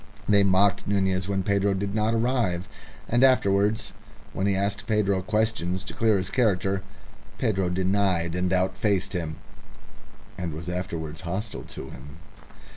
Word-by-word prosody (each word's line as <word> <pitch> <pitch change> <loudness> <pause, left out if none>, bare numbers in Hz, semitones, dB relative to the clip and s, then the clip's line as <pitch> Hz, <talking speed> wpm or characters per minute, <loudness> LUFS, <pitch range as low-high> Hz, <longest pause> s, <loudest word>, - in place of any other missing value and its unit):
They 100 -1 +5
mocked 95 0 +3
Nunez 95 -2 +1
when 95 -1 0
Pedro 100 0 +1
did 100 +1 -3
not 110 +1 +1
arrive, 115 -7 0 0.4
and 120 +3 +3
afterwards, 110 -4 +3 0.4
when 95 - 0
he 100 - +2
asked 100 +1 -1
Pedro 100 -3 +2
questions 105 -3 0
to - - -6
clear 110 -3 +3
his 95 0 -2
character, 100 -5 +1 0.6
Pedro 95 -7 0
denied 90 -2 +1
and 90 0 0
outfaced 95 +1 +1
him, 80 -3 -3 1.0
and 85 -4 -3
was 80 +2 -6
afterwards 85 -3 -4
hostile 95 +4 -4
to - - -8
him. 70 +4 -11
95 Hz, 140 wpm, -26 LUFS, 90-105 Hz, 1.0 s, They